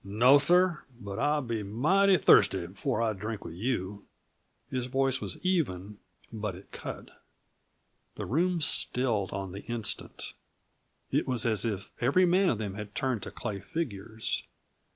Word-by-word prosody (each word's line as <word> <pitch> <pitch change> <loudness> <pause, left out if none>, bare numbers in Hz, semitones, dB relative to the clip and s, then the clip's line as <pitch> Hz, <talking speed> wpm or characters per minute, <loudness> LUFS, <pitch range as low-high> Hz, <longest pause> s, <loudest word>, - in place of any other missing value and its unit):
"No, 120 +8 +5
sir. 175 +1 +3 0.2
But 100 -4 -6
I'll 150 0 +1
be 115 -3 -2
mighty 185 - +3
thirsty 125 - +5
before 105 +6 -2
I 110 -1 +1
drink 105 +2 -5
with 80 - -7
you." 100 -1 -3 0.7
His 125 -1 -2
voice 135 0 +1
was 100 -4 -2
even, 105 - -1 0.3
but 105 -4 -3
it 95 - -14
cut. - - -8 0.9
The - - -5
room 170 +6 +1
stilled 120 -8 +1
on 95 -1 -4
the 100 +2 -7
instant; 120 -4 -4 0.8
it - - +1
was 125 -3 0
as 110 -3 +1
if 105 -3 -3
every 140 +10 +4
man 185 +2 +4
of 115 - +1
them 105 -3 -4
had 105 +1 -8
turned 130 -5 -1
to - - -7
lay 105 -3 -2
figures. 110 - -3
115 Hz, 150 wpm, -29 LUFS, 100-140 Hz, 0.9 s, No